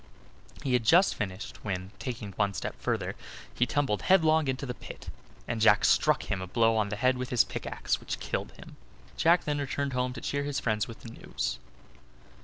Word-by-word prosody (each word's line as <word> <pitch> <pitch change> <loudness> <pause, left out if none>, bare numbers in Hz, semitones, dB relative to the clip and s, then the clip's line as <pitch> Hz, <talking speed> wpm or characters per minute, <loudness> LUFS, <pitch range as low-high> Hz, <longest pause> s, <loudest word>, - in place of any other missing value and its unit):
He 135 -3 0
had 125 -2 +3
just 175 - +5
finished, 95 0 -5
when, 95 -2 -3
taking 120 -5 -5
one 100 0 0
step - - -3
further, - - -1 0.4
he 125 - +1
tumbled 135 -6 0
headlong 160 -5 +4
into 130 +1 -2
the 125 - -3
pit, - - -10 0.4
and 115 -1 -2
Jack 105 -2 +5
struck - - +3
him 95 -2 -3
a 95 - -5
blow 115 +3 +3
on 105 -2 +1
the 105 - -2
head 125 +3 +2
with 125 - -3
his 125 - +4
pickaxe - - -3
which - - -5
killed - - -3
him. - - -13 0.4
Jack 170 - +4
then 150 -1 -1
returned 140 0 -2
home 125 0 0
to - - -8
cheer 140 - -1
his 140 -1 -2
friends 110 -2 0
with 115 - -10
the 115 - -9
news. - - -4
125 Hz, 200 wpm, -29 LUFS, 105-140 Hz, 0.4 s, just